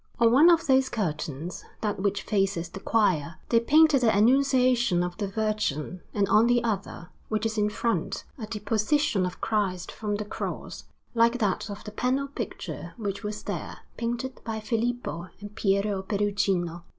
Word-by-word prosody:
On 230 -1 +5
one 290 +8 +7
of 335 -1 +4
those 265 -2 +3
curtains, 160 - -3 0.2
that 210 -2 -1
which 200 0 0
faces 195 -5 0
the 195 - -8
choir, 185 -8 +1
they 230 - +5
painted 300 +3 +5
the 235 - +4
Annunciation 250 -3 +3
of 175 0 -4
the 205 -1 -2
Virgin; 195 -6 -2
and 200 -1 +1
on 215 +4 +5
the 240 -1 +3
other, 200 -5 -3 0.2
which 215 +1 -1
is 225 0 -1
in 210 -1 +2
front, 230 +2 -1 0.2
a 215 - -5
Deposition 215 +1 +1
of 180 - -8
Christ 190 -4 -1
from 210 -2 -3
the 210 0 -3
Cross, - - -5 0.3
like 235 +1 +3
that 210 -2 -1
of 205 0 -7
the 210 - -7
panel 255 +5 0
picture 280 - -6
which 200 -3 -3
was 210 -1 -5
there, - - -5
painted 240 +3 -3
by 220 -1 -3
Filippo 230 -5 -2
and 205 0 -9
Pietro 200 -1 +1
Perugino. 195 -4 0
210 Hz, 165 wpm, -27 LUFS, 195-235 Hz, 0.3 s, one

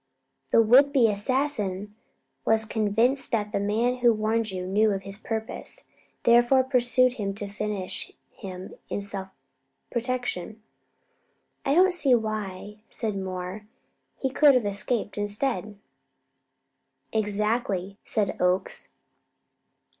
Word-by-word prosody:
The 230 - +5
would 265 +6 +6
be 260 -5 +5
assassin 210 -3 -1 0.5
was 220 0 +3
convinced 225 +5 +1
that 210 -2 0
the - - 0
man 225 +5 +1
who 240 -1 +5
warned 220 +1 0
you 185 -1 -4
knew 210 +4 +3
of 195 0 -4
his 195 +1 -7
purpose. 220 0 -5 0.4
He - - +5
therefore 240 +3 +5
pursued 255 -1 +3
him 200 -5 -3
to 205 0 -4
finish 205 -2 -4 0.2
him 185 -1 -8 0.2
in 200 - -3
self 195 -1 -6 0.6
protection." 235 -4 -3 1.0
"I 275 - +1
don't 370 +2 +5
see 285 -7 +3
why," 210 -2 -4
said 220 -4 -1
Moore; 190 +2 -5 0.5
"he 265 - -2
could 285 0 +6
have 245 -4 +2
escaped 205 +1 -2
instead." 210 0 -2 1.4
"Exactly," 210 -2 -1
said 210 -3 -1
Oakes. 180 +1 0
215 Hz, 120 wpm, -26 LUFS, 200-245 Hz, 1.4 s, would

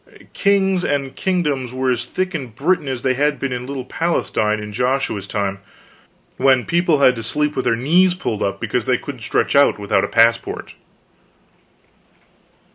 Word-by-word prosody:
"Kings" 195 -2 +2
and 140 -3 -2
"Kingdoms" 145 -9 -1
were 130 0 +1
as 120 -1 -2
thick 185 0 -2
in 140 -6 -4
Britain 145 +7 -1
as 130 -3 -4
they 130 -1 +2
had 145 +2 +1
been 135 -2 -3
in 125 0 -5
little 135 -2 -5
Palestine 110 -9 -1
in 105 0 -7
Joshua's 125 -4 -1
time, 100 -2 -2 0.8
when 130 -1 +3
people 165 -3 +2
had 125 -2 +5
to - - -4
sleep 150 +6 -1
with 130 - -2
their 115 - +2
knees 175 +9 +3
pulled 110 - -3
up 100 - -1
because - - -2
they - - +3
couldn't - - -8
stretch - - 0
out 140 0 +5
without 100 -1 0
a - - 0
passport. 115 +1 +1
135 Hz, 170 wpm, -19 LUFS, 115-160 Hz, 0.8 s, had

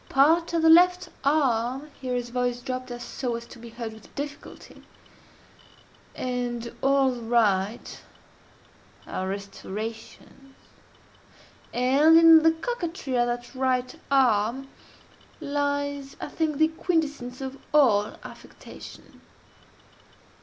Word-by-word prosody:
Part 325 +6 +3
of 330 -1 +1
the 325 - +6
left 360 +1 +5
arm 270 -1 +1
(here 255 -1 -2
his 245 -1 -3
voice 245 0 -1
dropped 255 0 -5
so 240 0 -4
as 235 0 -7
to 235 - -14
be 235 0 -10
heard 230 -1 -7
with 220 -1 -17
difficulty,) 290 0 -8 1.3
and 245 -2 -3
all 270 -1 +3
the 245 -1 -7
right, 220 -2 0 1.0
are 190 - -4
restorations; 215 +7 -8 1.2
and 275 +6 +4
in 330 -1 +8
the 325 +1 +5
coquetry 335 - -4
of 240 0 +2
that 240 +1 -4
right 255 -1 0 0.2
arm 260 -1 +2 0.7
lies, 285 -2 -2
I - - -6
think, 310 -1 -1
the 315 +1 +4
quintessence 295 -7 -2
of 270 0 -6
all 225 -9 +3
affectation. - - -13
260 Hz, 110 wpm, -25 LUFS, 240-295 Hz, 1.3 s, in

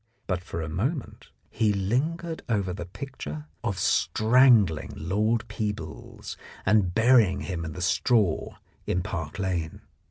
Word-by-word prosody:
But 90 -2 -2
for 85 -2 -4
a - - -4
moment 120 - -3 0.2
he 110 -2 +2
lingered 150 - -1
over 100 -5 0
the 90 -1 -6
picture 140 +8 -7 0.2
of 100 -6 -1
strangling 110 - +4
Lord 105 +7 0
Peebles 105 -8 -5 0.3
and 100 -2 +3
burying 115 -5 +5
him 85 -3 -4
in 80 -2 -5
the 90 - -4
straw 100 -1 +2 0.3
in 90 - 0
Park 85 -4 -4
Lane. 90 -5 -2
100 Hz, 130 wpm, -27 LUFS, 90-120 Hz, 0.3 s, burying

